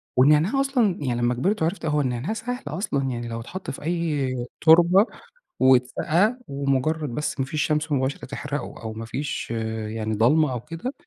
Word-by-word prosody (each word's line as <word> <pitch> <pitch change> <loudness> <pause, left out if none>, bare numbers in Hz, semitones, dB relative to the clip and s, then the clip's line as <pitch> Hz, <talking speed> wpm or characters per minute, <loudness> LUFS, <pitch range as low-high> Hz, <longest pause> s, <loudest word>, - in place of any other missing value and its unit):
والنعناع 150 - +4
أصلًا 245 -9 +1
يعني 120 -4 -1
لمّا 120 +1 +2
كبرت 190 - 0
وعرفت 165 +3 -1
هو 150 -1 +1
النعناع 130 - -2
سهل 245 +3 -4
أصلًا، 185 -8 -2
يعني 120 -1 -4
لو 115 0 -4
اتحط 170 +5 -6
في 135 - -9
أي 155 -5 -1 0.3
تربة، 175 +5 +6 0.5
واتسقى 150 - +3
ومجرد 140 +2 0
بس 150 +4 -3
ما 135 - +1
فيش 150 +3 -2
شمس 150 +1 0
مباشرة 135 0 -1
تحرقه 145 +1 -5
أو 110 -1 -4
ما 110 +1 -6
فيش 135 +2 -4 0.4
يعني 110 0 -3
ضلمة 140 +7 +3
أو 125 - -2
كده. 165 - -6
145 Hz, 170 wpm, -24 LUFS, 130-170 Hz, 0.5 s, تربة